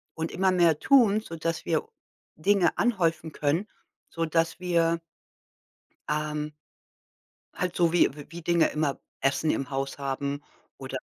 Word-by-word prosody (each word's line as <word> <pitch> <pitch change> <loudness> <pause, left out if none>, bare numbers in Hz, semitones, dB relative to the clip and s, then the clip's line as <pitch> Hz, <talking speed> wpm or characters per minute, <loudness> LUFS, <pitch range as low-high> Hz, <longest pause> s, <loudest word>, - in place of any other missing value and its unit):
und 160 0 -3
immer 190 0 +2
mehr 170 -4 +4
tun, 225 -6 +5
sodass 165 -3 -4
wir 440 - 0 0.5
Dinge 195 -4 +2
anhäufen 165 -8 +1
können, 160 +8 0 0.4
sodass 165 +1 0
wir 170 -2 +1 1.1
ähm 150 0 -2 1.1
halt 180 -1 -1
so 170 -2 +3
wie 175 - +5
w 145 +1 -11
wie 170 +2 -8
Dinge 170 0 +3
immer 150 -2 -1 0.2
Essen 135 +3 +2
im 135 - -2
Haus 135 0 -3
haben 140 +1 -3 0.3
oder, - - -5
165 Hz, 130 wpm, -27 LUFS, 150-175 Hz, 1.1 s, tun